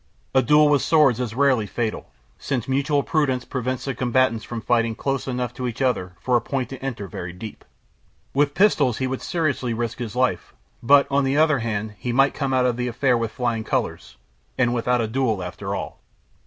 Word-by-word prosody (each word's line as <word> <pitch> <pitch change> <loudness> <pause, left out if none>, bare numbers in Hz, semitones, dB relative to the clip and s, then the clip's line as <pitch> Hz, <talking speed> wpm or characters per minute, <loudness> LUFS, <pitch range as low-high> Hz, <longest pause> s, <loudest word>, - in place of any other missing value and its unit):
A 130 - +5
duel 150 +2 +5
with 145 -2 +3
swords 150 -7 +4
is 120 -3 -3
rarely 130 -6 +2
fatal, 115 +1 -3 0.3
since 125 -5 -3
mutual 140 +2 +1
prudence 135 -6 0
prevents 130 -1 -3
the 135 - -2
combatants 120 -2 +1
from 120 - -5
fighting 115 -1 +1
close 135 +2 -2
enough 125 -2 -2
to 125 0 -4
each 120 0 -5
other 120 -9 0
for 125 +6 0
a 120 - +3
point 130 0 -3
to 135 -1 -9
enter 120 -7 -4
very 85 0 -6
deep. 105 +5 -9 0.7
With 145 +1 +1
pistols 150 - +3
he 130 - -1
would 130 0 -3
seriously 140 -8 -1
risk 120 +1 -3
his 120 -2 -5
life; 125 -9 0 0.3
but, 140 +3 +6
on 140 +1 +3
the 135 +1 +1
other 155 -3 +4
hand, 110 -2 -3
he 125 - -3
might 135 +3 +3
come 140 -2 -2
out 130 -1 +2
of 125 -2 +1
the 125 0 -1
affair 125 +1 +1
with 115 -1 -1
flying 115 -2 -2
colors, - - -3 0.4
and 120 -2 +2
without 125 0 +1
a 115 - -1
duel, 110 -5 0
after 90 -1 -5
all. - - -6
125 Hz, 205 wpm, -23 LUFS, 115-135 Hz, 0.7 s, but